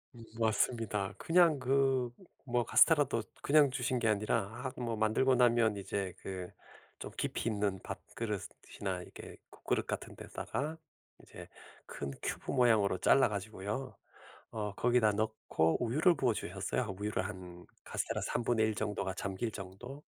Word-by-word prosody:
음 115 - -11 0.2
맞습니다. 110 -2 0
그냥 165 -3 +4
그 130 -1 +2 0.4
뭐 120 0 +3
카스텔라도 145 -3 +5 0.2
그냥 145 -1 +5
주신 125 -1 -1
게 115 - +1
아니라 110 +2 0
아 130 - -1
뭐 115 -1 -1
만들고 110 +5 +3
나면 120 -3 +4
이제 100 -1 -3
그 90 -2 -5 0.5
좀 - - -6
깊이 - - -2
있는 100 -4 0
밥그릇이나 105 -4 -5
이렇게 - - -11
국그릇 - - -2
같은 - - -5
데다가 150 +3 -4 0.5
이제 - - -11 0.4
큰 70 -1 -5
큐브 - - -3
모양으로 110 -7 +4
잘라가지고요 105 +2 +1 0.6
어 105 -2 -3
거기다 120 -3 +3
넣고 100 -7 +1
우유를 155 +10 +4
부어주셨어요. 105 -3 -1
우유를 105 -2 -1
한 90 -3 -9 0.2
카스텔라 - - -2
3 120 - -1
분의 115 -2 +2
1 110 -1 +1
정도가 100 -3 -2
잠길 100 +5 -3
정도? 105 +9 -9
110 Hz, 300 characters per minute, -33 LUFS, 100-125 Hz, 0.6 s, 카스텔라도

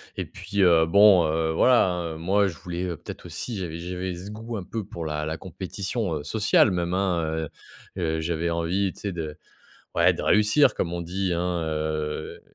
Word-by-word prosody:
et - - -3
puis, 100 0 -3
heu, 85 -3 +6
bon, 100 0 +6
heu, 80 +1 0
voilà, 120 +9 +5
hein, 85 -2 -3
heu. - - -7
Moi, 100 +5 +2
je 90 - -5
voulais, 90 0 -5
heu, 85 - -3
peut - - -8
être - - -12
aussi, 120 -4 -5
j'avais 85 -4 -4
j'avais 90 +1 -4
ce 95 +4 -8
goût 115 +2 -6
un 100 - -4
peu 110 +2 -5
pour 85 -4 -7
la 75 0 -2
la 80 +1 -3
compétition, 95 +3 -4
heu, 75 - -4
sociale, 105 +4 +3
même 85 -1 -1
hein, 95 -3 +1
heu. 80 -1 -3 0.5
Heu, 80 -3 -1
j'avais 85 +1 -1
envie 85 +3 0
tu - - -16
sais 100 - -2
de 80 -3 -5 0.6
ouais - - +5
de - - -5
réussir 105 +8 +4
comme 85 - -2
on 85 - -3
dit 90 +2 -2
hein, 85 0 -1
heu 75 -1 -3
85 Hz, 210 wpm, -25 LUFS, 80-100 Hz, 0.6 s, heu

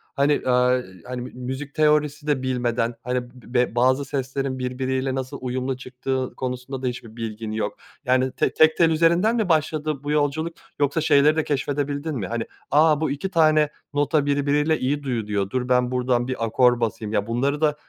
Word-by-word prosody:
hani, 145 +1 +2
aaa, 125 0 +3 0.2
hani 125 -1 -5
m 125 - -6
müzik 130 +3 -6
teorisi 150 -1 +2
de 135 -3 +1
bilmeden 120 -2 -1
hani 125 0 -1
be 120 -2 -1
bazı 130 +3 +3
seslerin 135 -1 -3
birbiriyle 130 +1 -2
nasıl 135 +1 -4
uyumlu 130 +1 -2
çıktığı 130 0 -4
konusunda 130 +1 -4
da 130 - -1
hiçbir 115 -2 -6
bilgin 110 -1 -5
yok 110 -1 -3 0.3
yani 130 +1 +2
te - - 0
tek 155 0 +4
tel 165 -2 +5
üzerinden 170 +7 +3
mi 215 -6 0
başladı 155 -2 0
bu 145 - -2
yolculuk 150 +3 0 0.3
yoksa 145 +3 +1
şeyleri 150 0 +4
de 160 - +1
keşfedebildin 145 +1 -2
mi? 105 -7 -3
Hani 115 +4 -2 0.3
"A! 155 +1 +4
Bu 155 -3 0
2 145 +7 -3
tane 155 -3 +4 0.2
nota 145 0 +2
birbiriyle 145 +2 +1
iyi 145 +3 -1
duyuluyor. 105 -6 -2
Dur, 125 +1 -2
ben 125 0 +2
burdan 125 -1 +1
bir 125 -3 -2
akor 120 +2 +3
basayım." 110 -2 -2
Ya, 105 -1 0
bunları 140 +6 0
da 150 -1 +3
130 Hz, 180 wpm, -23 LUFS, 125-150 Hz, 0.3 s, tel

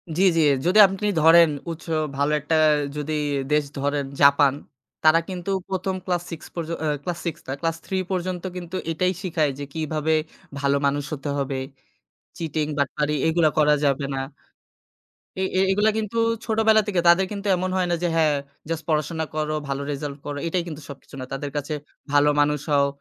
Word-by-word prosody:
জি, 180 - 0 0.2
জি। 165 - +5 0.2
যদি 185 +5 +4
আপনি 195 +2 -3
ধরেন 165 0 +7 0.2
উচ্চ 165 - -8 0.3
ভালো 145 +2 +1
একটা 155 +3 -1 0.4
যদি 150 +1 -3 0.4
দেশ 150 0 +3
ধরেন 145 0 -1 0.2
Japan, 140 -1 +6 0.5
তারা 155 +1 +6
কিন্তু 180 0 -5 0.2
১ম 190 0 -2
ক্লাস 175 -2 -1
6 160 - -7
পর্য 165 -2 -4 0.2
আ - - +1 0.2
ক্লাস 175 -1 -3
6 170 - -3
না 135 - -2
ক্লাস 165 0 -1
3 190 - -2
পর্যন্ত 180 -1 -2
কিন্তু 175 0 -7
এইটাই 180 +3 +1
শিখায় 160 -5 +1
যে 145 - -4
কিভাবে 155 0 -1 0.5
ভালো 140 0 +2
মানুষ 145 +1 +1
হতে 145 0 -4
হবে। 135 -1 -2 0.8
চিটিং, 155 -2 -2
বাটপারি 150 +2 0
এগুলা 160 -1 +3
করা 150 -1 +5
যাবে 140 0 +1
না। 135 - -2 1.2
এ - - 0 0.2
এ - - +4
এগুলা 210 +3 +3
কিন্তু 220 +1 -3 0.3
ছোটবেলা 220 -1 +4
থেকে 190 -4 +1
তাদের 175 +3 +6
কিন্তু 205 0 -4
এমন 185 +1 -2
হয় 180 - +1
না - - +3
যে - - +3
হ্যাঁ 155 -2 +4 0.4
জাস্ট 165 -1 -2
পড়াশোনা 155 +1 0
করো, 155 0 -1
ভালো 140 0 -2
রেজাল্ট 140 0 -5
করো, 145 -1 -4
এটাই 175 +1 0
কিন্তু 155 -2 -7
সবকিছু 140 -1 -12
নয়। 130 - -7
তাদের 140 +1 -4
কাছে 145 +2 -3 0.4
ভালো 145 0 +5
মানুষ 150 0 +2
হও, 140 -1 +4
160 Hz, 175 wpm, -24 LUFS, 145-180 Hz, 1.2 s, ধরেন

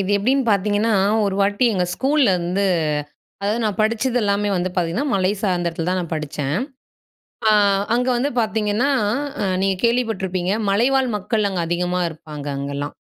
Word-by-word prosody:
இது 195 +1 -1
எப்டின்னு 260 +6 +1
பார்த்தீங்கன்னா, 205 +2 +1 0.3
ஒரு 195 - -1
வாட்டி 205 +5 +2
எங்க 180 - +1
ஸ்கூல்ல 270 -4 +2
வந்து 180 +4 -1 0.8
அதாவது 210 +3 0
நான் 210 -3 -1
படிச்சது 230 +3 +1
எல்லாமே 205 0 +1
வந்து 180 +1 -1
பார்த்தீங்கன்னா, 180 - 0
மலை 190 0 +2
சார்ந்த 180 -4 0
இடத்துலதான் 175 +3 -2
நான் 170 -1 -5
படிச்சேன். 150 -1 -3 0.9
ஆ - - +6 0.4
அங்க 250 +2 +1
வந்து 275 +4 0
பார்த்தீங்கன்னா, 220 +3 0 0.5
அ - - 0 0.2
நீங்க 195 0 +1
கேள்விப்பட்டுருப்பீங்க, 195 -7 0 0.2
மலைவாழ் 255 +5 +2
மக்கள் 210 +1 0
அங்க 185 -3 -2
அதிகமா 180 +1 -1
இருப்பாங்க 150 -2 -9
அங்கல்லாம். 140 +1 -4
200 Hz, 145 wpm, -21 LUFS, 180-225 Hz, 0.9 s, ஆ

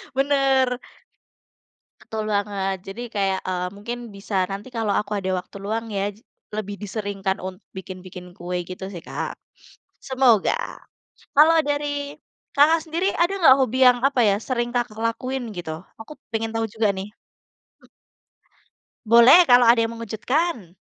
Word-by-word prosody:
Benar. 270 -2 +2 1.2
Betul 220 -1 -5
banget. 200 -1 -1
Jadi 205 +5 -7
kayak, 195 -1 +1
eee, 180 -1 -1
mungkin 235 +4 -5 0.2
bisa 195 0 -6 0.2
nanti 200 +5 -6
kalau 225 -4 -1
aku 210 0 -6
ada 190 -1 -3
waktu 185 - -12
luang, 225 +2 -2
ya, 195 -1 -1
j - - -21 0.3
lebih 210 -1 -4
diseringkan 200 -2 -3
un 185 0 -6 0.2
bikin-bikin 185 -1 -9
kue, 180 +1 -4
gitu, 185 +1 -7
sih, 175 - -7
Kak. - - -4 0.7
Semoga. 255 -6 +3 0.8
Kalau 310 +3 +7
dari 290 0 -2 0.4
Kakak 310 +3 +5
sendiri 340 +4 0
ada 345 - +4
nggak 270 -7 +8
hobi 255 -1 +1
yang 245 -1 +5
apa, 265 -3 +1
ya, 200 - +3
sering 240 -2 -1
Kakak 230 -3 -2
lakuin, 255 +3 -2
gitu? 170 -2 -5 0.3
Aku 305 - -10 0.2
pengen 225 0 -1
tau 225 0 0
juga, 220 0 0
nih. 190 +2 -5 0.7
Mmm. - - -22 1.2
Boleh, 235 +10 +8
kalau 245 0 +7
ada 230 0 +6
yang 230 0 -2
mengejutkan. 230 - -2
225 Hz, 145 wpm, -23 LUFS, 195-260 Hz, 1.2 s, nggak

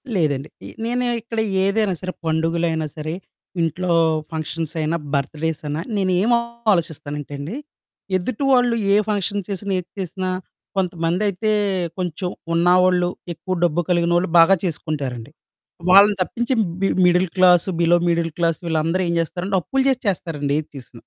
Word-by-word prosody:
లేదండి. 145 -5 0 0.2
ఏ - - -8 0.2
నేను 245 +1 0 0.2
ఇక్కడ 225 0 -4 0.2
ఏదైనా 200 -1 +1
సరే, 185 0 -3
పండుగలైనా 160 0 0
సరే, 155 +1 -4 0.5
ఇంట్లో 175 +2 -1 0.4
ఫంక్షన్స్ 160 0 -4
అయిన, 155 +2 0 0.2
బర్త్ 140 +2 -1
డేస్ 160 -1 -1
అయిన, 145 +1 -2 0.2
నేను 190 -1 +1
ఏమోలోచిస్తానంటేండి 185 - -1 0.6
ఎదుటి 225 +8 -3
వాళ్ళు 245 -2 +4 0.2
ఏ - - +5
ఫంక్షన్ 205 -1 -1
చేసినా, 200 0 -4
ఏది 180 - -10
చేసినా, 185 +1 -3 0.5
కొంతమందైతే 185 +4 0 0.5
కొంచెం 180 0 -3 0.2
ఉన్నవాళ్ళు 180 +1 +4 0.3
ఎక్కువ 185 +4 -4
డబ్బు 175 0 +2
కలిగినోళ్ళు 175 +1 +2
బాగా 190 +4 +7
చేసుకుంటారండి. 145 -7 -3 0.6
వాళ్ళని 200 +2 +7
తప్పించి 240 +7 -1 0.3
B 195 - +3 0.2
middle 180 +1 +4
class 180 0 +5
below 170 +1 +4
middle 170 -1 +1
class 165 -1 +1
వీళ్ళందరూ 165 +3 0
ఏం 170 - 0
చేస్తారంటే 180 +4 -2
అప్పులు 265 +9 0
చేసి 260 -2 0
చేస్తారండి. 150 -6 -2
ఏది 155 - -17
చేసినా. 125 -1 -12
175 Hz, 135 wpm, -21 LUFS, 160-195 Hz, 0.6 s, బాగా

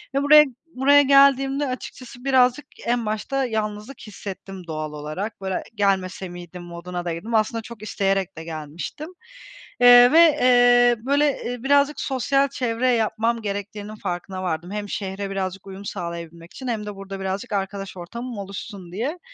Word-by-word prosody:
ve 275 - +2
buraya 300 +1 +8 0.3
buraya 285 +3 +6
geldiğimde, 275 0 +4
açıkçası, 255 -1 -8
birazcık 260 +1 +3 0.2
en 240 -1 0
başta 220 +6 -1
yalnızlık 215 +2 -4
hissettim, 195 -3 -9
doğal 155 -1 -4
olarak. 155 +9 -5
Böyle, 190 -1 -2
e - - -3
"Gelmese 190 -2 0
miydim?" 175 0 -9
moduna 175 +1 -6
da 170 - -1
girdim. 215 +8 -4
Aslında 225 +1 +1
çok 225 -1 -11
isteyerek 195 -4 -1
de 160 - -6
gelmiştim. 160 - -7 0.7
Eee, 245 0 +9
ve, 325 - +6 0.2
eee, 245 -1 +6
böyle, 285 +1 +2
eee, 245 0 -5
birazcık 285 +1 +3
sosyal 275 +1 +1
çevre 250 -2 -1
yapmam 230 0 0
gerektiğinin 205 +1 -5
farkına 185 -1 -5
vardım; 175 0 -3
hem 205 0 -4
şehre 195 0 -4
birazcık 195 0 -4
uyum 195 +1 -9
sağlayabilmek 170 -1 -7
için 260 - -8
hem 220 -3 -2
de 210 -1 -6
burada 195 0 -8
birazcık 195 +5 -4
arkadaş 195 -1 -3
ortamım 235 +7 -7
oluşsun 195 -2 -8
diye. 260 - -3
210 Hz, 155 wpm, -23 LUFS, 190-250 Hz, 0.7 s, Eee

